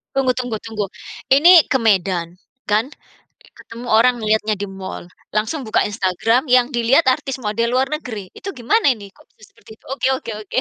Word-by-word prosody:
Tunggu 265 -2 +2
tunggu 245 -3 -3
tunggu, 215 -2 -3 0.5
ini 335 +4 +7
ke 265 - +4
Medan 185 -5 0 0.3
kan? 215 +3 +2 0.7
Ketemu 235 +2 -9
orang 230 +1 +3
ngeliatnya 215 0 +1
di 200 0 -6
mall, 190 -2 -8 0.2
langsung 225 +5 -2
buka 215 - +2
Instagram 210 - 0
yang 250 +1 +3
dilihat 260 +4 +3
artis 270 -1 -3
model 230 +3 -1
luar 265 +2 +1
negeri, 225 - -6
itu 395 -4 -8
gimana 265 - +1
ini, 200 -3 -12
kok - - -24
bisa 215 - -19
seperti - - -21
itu? - - -35
Oke 270 -1 -1
oke 235 - -6 0.2
oke. - - -3
230 Hz, 175 wpm, -19 LUFS, 210-260 Hz, 0.7 s, ini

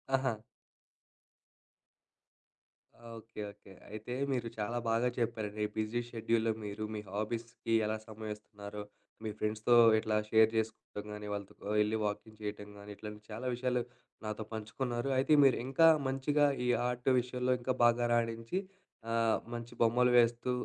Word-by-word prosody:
ఆహా! 130 -2 +1 2.8
Okay. 115 -1 -9
Okay. 100 -1 -16 0.2
అయితే 110 +3 -6 0.2
మీరు 125 -3 -1
చాలా 110 +3 -2
బాగా 115 +2 +2
చెప్పారండి. 110 -3 -2
బిజీ 110 +2 0
షెడ్యూల్‌లో 115 0 +1
మీరు 105 +1 -5
మీ 105 - -3
హాబీస్‌కి 115 +2 -3
ఎలా 110 +1 -1
సమయం 110 0 -6
ఇస్తున్నారో, 105 -1 -9 0.4
మీ 110 - -2
ఫ్రెండ్స్‌తో 110 +3 +2 0.2
ఇట్లా 110 0 -1
షేర్ 110 0 +6
చేసుకోవడం 110 -2 -3
కానీ, 105 0 -7
వాళ్ళతో 100 -1 -5 0.3
వెళ్లి 105 +1 +2
వాకింగ్ 105 +1 -4
చేయటం 105 0 -5
గానీ, 100 0 -10
ఇట్లాంటి 105 0 -8
చాలా 115 +4 -4
విషయాలు 125 0 0 0.4
నాతో 110 +1 -3
పంచుకున్నారు. 120 +4 -3
అయితే 135 +4 +3
మీరు 135 -3 +5
ఇంకా 165 +5 +5 0.2
మంచిగా 140 +3 +2 0.2
ఈ - - +1 0.2
ఆర్ట్ 125 +1 -1
విషయంలో 125 +1 0
ఇంకా 130 +1 0
బాగా 120 0 +5
రాణించి, 115 +7 0 0.5
ఆహ్! 115 -1 +3 0.2
మంచి 120 0 -6
బొమ్మలు 125 +2 +4
వేస్తూ 120 +1 +2
115 Hz, 135 wpm, -33 LUFS, 105-120 Hz, 2.8 s, షేర్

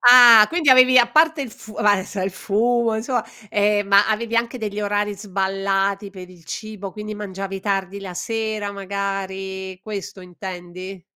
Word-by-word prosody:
Ah 245 -3 +9
quindi 330 -5 +2
avevi 255 0 +7
a 240 -1 +5
parte 315 +2 +3
il 255 - -7
fu 220 0 -13
v - - -10
adesso 200 -1 +1
il 190 - -1
fumo, 230 +5 0
insomma 240 +2 -2 0.3
eh, 205 0 +2
ma 200 +1 +4
avevi 230 +1 -1
anche 235 +2 0
degli 210 -3 -4
orari 205 0 -1
sballati 195 0 -1
per 185 -2 -11
il 175 -2 -18
cibo, 205 +1 -7
quindi 215 0 -7
mangiavi 195 -1 -6
tardi 195 -1 -2
la 190 -2 -8
sera 215 +2 -3
magari, 195 -1 -5
questo 200 -2 -7
intendi? 180 0 -9
205 Hz, 160 wpm, -21 LUFS, 195-220 Hz, 0.3 s, Ah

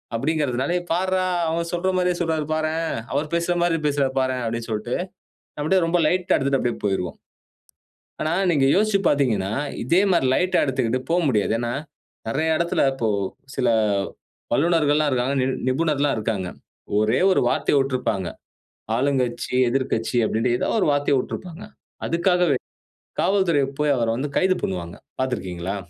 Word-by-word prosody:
அப்படிங்கறதனால 140 +2 0 0.2
"பார்ரா! 185 +1 +1 0.2
அவங்க 165 +1 0
சொல்ற 175 +2 0
மாரியே 180 -1 +1
சொல்கிறாரு 160 -3 0
பாரேன். 160 +1 -1 0.3
அவர் 145 +3 0
பேசுறா 170 +1 +1
மாரி 170 -1 +2
பேசுறார் 140 -2 0
பாரேன்." 130 -1 -1
அப்படினு 115 0 -3
சொல்ட்டு 110 +3 -2 0.6
அப்படியே 170 +6 +2
ரொம்ப 170 +1 +1
லைட்‌டா 180 +1 +2
எடுத்துட்டு 135 0 +1
அப்படியே 120 -1 -1
போய்ருவோம். 95 -3 -1 1.0
ஆனா 155 +1 0 0.2
நீங்க 140 -5 +3
யோசிச்சு 210 0 +3
பாத்தீங்கனா, 110 -9 +1 0.3
இதே 170 +9 +3
மாரி 170 -6 +3
லைட்‌டா 185 +1 +2
எடுத்துக்குட்டு 130 -2 0
போ 170 - +3
முடியாது. 110 -2 +1
ஏன்னா 120 0 -2 0.6
நிறைய 160 +7 +1
இடத்தில 170 -3 +1
இப்போ 115 -4 -1 0.5
சில - - +1 0.8
வல்லுனர்கள்ல்லாம் 150 +1 +3
இருக்காங்க, 130 +2 0
நி 130 - +1 0.2
நிபுணர்கள்ல்லாம் 145 0 +1
இருக்காங்க. 105 -4 -2 0.5
ஒரே 110 +3 +2
ஒரு 185 - +3
வார்த்தைய 145 - +2
உட்டிருப்பாங்க. 115 -9 -1 0.7
ஆளுங்கட்சி, 130 -2 0 0.2
எதிர்க்கட்சி 125 -2 -1
அப்படின்டு 115 +3 +1
ஏதாவது 225 - 0
ஒரு - - +2
வார்த்தைய 145 -2 +2
உட்டிருப்பாங்க. 180 +6 -7 0.4
அதுக்காகவே 175 -4 +2 0.6
காவல்துறை 190 -7 +2 0.2
போய் 150 -1 +3
அவர 115 -2 0
வந்து 140 +4 -3
கைது 185 0 +2
பண்ணுவாங்க. 85 -2 -4 0.2
பாத்திருக்கிங்களா? 95 -7 -3
140 Hz, 135 wpm, -23 LUFS, 120-170 Hz, 1.0 s, நீங்க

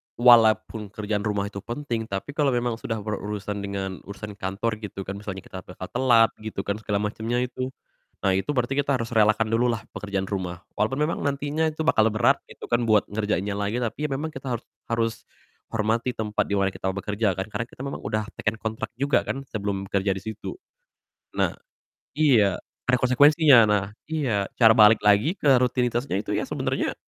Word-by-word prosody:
walaupun 110 -2 +5
kerjaan 105 -1 -1
rumah 100 -1 0
itu 100 - -6
penting, 115 0 -4
tapi 100 +8 -4
kalau 145 -3 +1
memang 120 -1 -1
sudah 115 - -3
berurusan 105 -1 -4
dengan 95 -1 -4
urusan 100 0 -8
kantor 105 +4 -2
gitu 100 -2 -6
kan, 100 +1 -6
misalnya 95 -2 -6
kita 95 - -8
bakal 90 0 -9
telat 120 -3 +4
gitu 110 -3 -5
kan, 100 +1 -2
segala 105 -1 -1
macemnya 115 +4 -1
itu. 130 +1 -3 0.6
Nah, 95 - +3
itu 95 +9 -1
berarti 125 +1 0
kita 140 -1 +2
harus 115 0 -4
relakan 110 0 +3
dulu 115 +2 +2
lah 115 -2 -1
pekerjaan 100 -2 -3
rumah, 95 -3 -4 0.2
walaupun 130 +7 +1
memang 165 - -1
nantinya 145 +3 0
itu 155 0 -3
bakal 110 -8 +4
berat 110 -1 +3
gitu - - -11
kan, 120 -1 +2
buat 105 -2 +5
ngerjainnya 105 -1 -1
lagi 110 +5 -1
tapi, 150 +6 -2
ya - - -12
memang 155 +3 -3
kita 130 -3 -4
harus 115 - -8 0.2
harus 115 -1 0 0.5
hormati 115 +3 0
tempat 105 -1 -1
di 100 - 0
mana 100 -1 +2
kita 95 - -5
bekerja 100 0 -1
kan. 95 +3 -5
Karena 115 +3 -3
kita 130 - -10
memang 140 - -4
udah 110 0 -2 0.2
teken 105 +1 0
kontrak 110 0 -3
juga 140 +3 +1
kan 135 +1 -3
sebelum 100 -2 -2
kerja 100 0 +1
di 95 - -6
situ. 110 - -6 0.8
Nah - - +2 0.6
iya, 115 -11 +4 0.3
ada 125 0 +3
konsekuensinya, 145 +2 +6
nah 100 -2 +2 0.3
iya, 120 -11 0
cara 115 -2 +8
balik 105 0 +7
lagi 105 - +4
ke 145 - -1
rutinitasnya 125 -2 0
itu - - -6
ya - - 0
sebenernya, - - -1
110 Hz, 185 wpm, -25 LUFS, 100-125 Hz, 0.8 s, cara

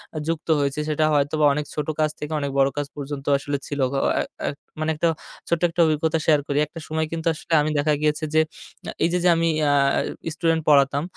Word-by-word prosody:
আ - - -3
যুক্ত 165 -1 -3
হয়েছি। 140 0 -1
সেটা 155 0 +1
হয়তোবা 150 +1 +2
অনেক 150 +1 -2
ছোটো 150 0 -2
কাজ 155 0 +3
থেকে 150 +1 -5
অনেক 140 -1 -3
বড়ো 135 0 +4
কাজ 145 -1 -1
পর্যন্ত 140 -1 -6
আসলে 140 +1 -3
ছিল। 145 - -4 0.4
এ - - +2 0.3
এ - - +1 0.3
মানে 155 0 -1
একটা 160 +3 +1 0.4
ছোট্ট 170 -1 0
একটা 165 - -8
অভিজ্ঞতা 160 +1 +1
শেয়ার 155 -2 +4
করি। 140 - -1
একটা 165 - -10
সময় 160 0 -1
কিন্তু 165 0 -3
আসলে 160 - -6
আমি 150 - 0
দেখা 150 +1 +2
গিয়েছে 150 +1 0
যে, 155 - +5 0.5
আ - - -3
এই - - +3
যে, - - +3
যে, 180 - +5
আমি 165 0 +1
অ্যা 145 -1 +3 0.6
স্টুডেন্ট 165 -1 +1
পড়াতাম 140 0 +4
150 Hz, 215 wpm, -23 LUFS, 145-160 Hz, 0.6 s, যে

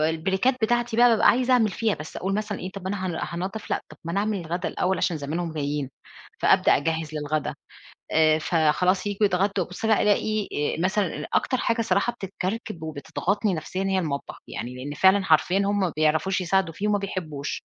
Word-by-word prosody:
البريكات 190 +10 +1
بتاعتي 240 0 +1
بقى 245 +1 +7
بابقى 225 -2 +3
عايزة 255 +1 +3
أعمل 230 -4 +4
فيها، 220 +1 0
بس 150 +1 -9
أقول 195 +1 -2
مثلًا 210 -1 -2
إيه 185 - -5
طَب 195 - -8
ما 185 - -4
أنا 195 -1 -3
هان 175 - -2 0.3
هانضَّف 205 +3 -6
لأ، - - +1
طَب - - -13
ما 170 - -4
أنا 200 - +1
أعمل 210 -1 -1
الغدا 170 +2 -3
الأول 190 +1 0
عشان 170 - 0
زمانهم 160 +3 -3
جايين، 145 -2 -2 0.5
فأبدأ - - +4
أجهّز 160 +1 -2
للغدا. 150 0 -2 0.6
آآ 155 0 +4
فخلاص 175 +4 +2
ييجوا 205 +1 0
يتغدوا، 195 0 +1
أبُص 180 +6 -5
بقى 220 -2 +3
ألاقي 210 +1 +2 0.3
آآ - - -5
مثلًا 190 -6 0
أكتر 255 - +2
حاجة 230 0 +1
صراحة 240 +1 +1
بتتكرِّكب 195 -1 -5
وبتضغطني 180 +6 -1
نفسيًا 165 +4 -4
هي 190 -1 +1
المطبخ، 145 -5 -3
يعني 120 +2 -6
لأن 145 +3 -6
فعلًا 190 +4 +4
حرفيًا 170 +3 +3
هُم 200 0 +1
ما 180 -5 0
بيعرفوش 160 +5 +2
يساعدوا 185 -1 +1
فيه 210 +4 -2
وما 205 -1 +2
بيحبوش. 155 -8 -4
185 Hz, 190 wpm, -25 LUFS, 160-205 Hz, 0.6 s, بقى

